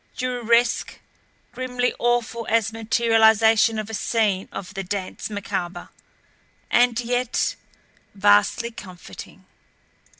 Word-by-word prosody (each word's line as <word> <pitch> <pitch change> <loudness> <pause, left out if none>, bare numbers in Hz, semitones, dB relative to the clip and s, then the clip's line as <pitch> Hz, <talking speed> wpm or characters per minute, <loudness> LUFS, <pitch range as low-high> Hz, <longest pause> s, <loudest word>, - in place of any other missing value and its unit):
Dureresque, 240 -2 0 0.5
grimly 250 0 -2
awful 240 -1 0
as 225 0 +1
materialization 225 -1 +3
of 215 -1 -4
a 225 - -8
scene 205 -2 0
of 200 +2 -7
the 195 -1 -4
Dance 190 +2 -5
Macabre 190 -4 -5 0.8
and 240 -1 +3
yet 245 0 -1 0.6
vastly 195 - +3
comforting. 180 - -11
225 Hz, 95 wpm, -23 LUFS, 200-240 Hz, 0.8 s, materialization